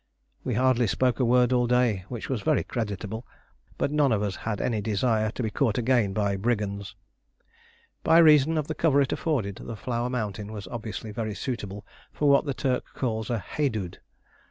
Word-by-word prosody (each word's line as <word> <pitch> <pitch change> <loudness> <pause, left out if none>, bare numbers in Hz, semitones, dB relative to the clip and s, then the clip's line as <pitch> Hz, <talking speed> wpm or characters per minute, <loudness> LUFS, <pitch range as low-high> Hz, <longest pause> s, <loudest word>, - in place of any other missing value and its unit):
We 125 - -1
hardly 125 -1 +3
spoke 125 +5 +1
a 125 - +3
word 125 +1 +4
all 125 -1 +2
day, 120 -6 +2
which 120 -3 -5
was 130 -6 -2
very - - +2
creditable; 110 -1 -4 0.5
but - - 0
none 150 -3 +3
of 105 -2 +1
us 100 -2 -2
had 105 -2 -3
any 115 -4 0
desire 110 +1 +1
to 120 - -4
be 110 - -1
caught 105 0 +1
again 120 -4 +2
by 100 -1 0
brigands. 100 -2 -2 1.1
By 160 - +5
reason 155 -1 +6
of 155 - 0
the 155 - -3
cover 155 -3 +3
it 135 - 0
afforded 110 - -1
the 115 - -7
Flower 120 +2 -2
Mountain 105 -4 -3
was 105 -3 -7
obviously 110 -2 -6
very 110 -1 -3
suitable 105 -6 -5 0.3
for 150 - 0
what 140 +1 +5
the 140 -2 -2
Turk 130 -3 0
calls 110 -4 -2
a 120 - 0
"Haidood." 110 - -3
115 Hz, 185 wpm, -26 LUFS, 105-130 Hz, 1.1 s, reason